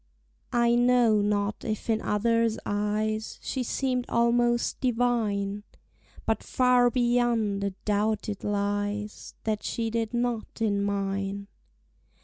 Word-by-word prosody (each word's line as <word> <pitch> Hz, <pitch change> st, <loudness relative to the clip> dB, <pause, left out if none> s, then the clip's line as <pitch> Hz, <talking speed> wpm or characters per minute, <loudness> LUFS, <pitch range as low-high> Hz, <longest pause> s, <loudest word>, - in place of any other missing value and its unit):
I 235 Hz, 0 st, +4 dB
KNOW 240 Hz, -3 st, +4 dB
not 205 Hz, 0 st, -1 dB
if 215 Hz, -2 st, -3 dB
in 220 Hz, -1 st, +1 dB
others' 230 Hz, +1 st, +1 dB
eyes 215 Hz, +1 st, -1 dB
She 265 Hz, -, -2 dB
seem'd 250 Hz, 0 st, -1 dB
almost 240 Hz, 0 st, +2 dB
divine; 225 Hz, -5 st, 0 dB, 0.6 s
But 220 Hz, -1 st, 0 dB
far 250 Hz, -1 st, +3 dB
beyond 240 Hz, -4 st, +1 dB
a 200 Hz, -, +1 dB, 0.2 s
doubt 210 Hz, +1 st, 0 dB
it 205 Hz, -2 st, -5 dB
lies 205 Hz, +1 st, -2 dB
That 215 Hz, -1 st, -1 dB
she 225 Hz, -1 st, -2 dB
did 225 Hz, -1 st, -1 dB
not 240 Hz, -2 st, -2 dB
in 205 Hz, -3 st, +1 dB
mine. 200 Hz, 0 st, -2 dB
220 Hz, 120 wpm, -27 LUFS, 205-240 Hz, 0.6 s, I